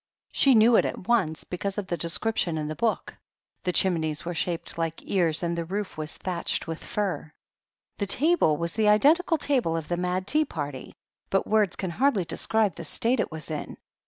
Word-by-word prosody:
She 270 -2 +4
knew 225 +1 +6
it - - +3
at 185 - -5
once, 185 -10 +1
because 195 +2 -4
of 205 - -2
the 175 - -2
description 170 0 0
in 150 -1 -3
the 155 - -4
book: 230 +3 -2 0.4
"The 180 - -1
chimneys 165 -5 0
were 175 - -3
shaped 170 0 -2
like 165 -1 -3
ears 170 -4 +1
and 170 0 -1
the 170 - -2
roof 195 +3 -4
was 155 0 -2
thatched 180 -2 -2
with 165 0 -6
fiir." 195 -7 -3 0.7
The 200 - -1
table 280 - +3
was 170 +1 -2
the 215 -1 +2
identical 315 - +4
table 250 - 0
of 160 - -6
the 175 - 0
"Mad 180 +1 -1
Tea 305 +9 +4
Party," 145 - -6 0.3
but 195 - +1
words 210 -4 +2
can 185 -3 -4
hardly 220 - +1
describe 215 +2 +1
the - - -6
state 240 +2 0
it - - -1
was 160 0 -6
in. 150 - -5
180 Hz, 195 wpm, -26 LUFS, 165-220 Hz, 0.7 s, knew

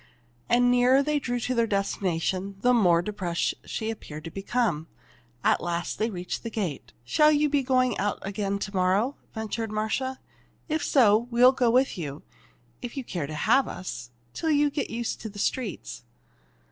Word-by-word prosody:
And 240 +1 +4
the - - +5
nearer 255 +3 +5
they 300 0 +1
drew 245 -3 -2
to 255 - -1
their 230 -2 +2
destination, 195 -1 -1
the 250 +2 +4
more 175 -7 +4
depressed 185 -4 -1
she 220 0 -3
appeared 155 -8 -8
to 165 - -7
become. 195 -5 -1 0.6
At - - +3
last 175 0 -3
they 220 +2 +1
reached 180 -4 -5
the 230 - -5
gate. 195 -10 -4
"Shall 300 - +4
you 300 0 +3
be 285 -1 +2
going 255 -1 +2
out 205 0 0
again 200 0 -2
to 200 0 -5
morrow?" 190 +9 +2 0.2
ventured 220 0 -3
Marcia. 220 +5 -2 0.5
"If 315 -2 -1
so, 230 -3 +4
we 235 0 0
will 250 +1 +9
go 250 -2 +2
with 255 -3 +2
you, 145 -3 -6 0.6
if 245 +2 -7
you 270 - -2
care 170 -10 -4
to 155 - -6
have 240 - +3
us, 125 -10 -6 0.2
till 320 - -2
you 295 -1 +3
get 290 - -2
used 235 0 -3
to 220 - -5
the 205 - -12
streets." 175 - -3
220 Hz, 185 wpm, -26 LUFS, 185-255 Hz, 0.6 s, will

